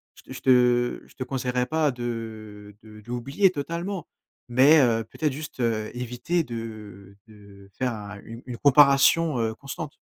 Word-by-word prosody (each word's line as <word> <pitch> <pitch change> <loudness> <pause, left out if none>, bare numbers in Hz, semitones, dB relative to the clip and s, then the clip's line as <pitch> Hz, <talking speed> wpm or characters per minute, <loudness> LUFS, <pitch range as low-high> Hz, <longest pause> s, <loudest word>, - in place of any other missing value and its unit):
je - - -17
te - - -15
je - - -8
te 125 -1 +3
je - - -20
te 130 - -4
conseillerais 125 -1 -2
pas 155 -2 +1
de, 110 -4 -7
heu, - - -29 0.2
de - - -13
d'oublier 125 - 0
totalement 170 +3 -4 0.4
mais 135 +6 +6
heu, 115 -4 +3
peut-être 150 +6 -3
juste, 150 -1 -8
heu, 110 -3 -1
éviter 125 +8 -2
de, 120 - -7
heu, 105 -4 -9
de 100 -2 -16
faire 125 -2 -1
un 100 -2 -8
une 115 +1 -10
une 125 -2 -6
comparaison 145 +2 +5
heu, 110 -1 0
constante. 140 +3 -7
125 Hz, 170 wpm, -25 LUFS, 110-140 Hz, 0.4 s, mais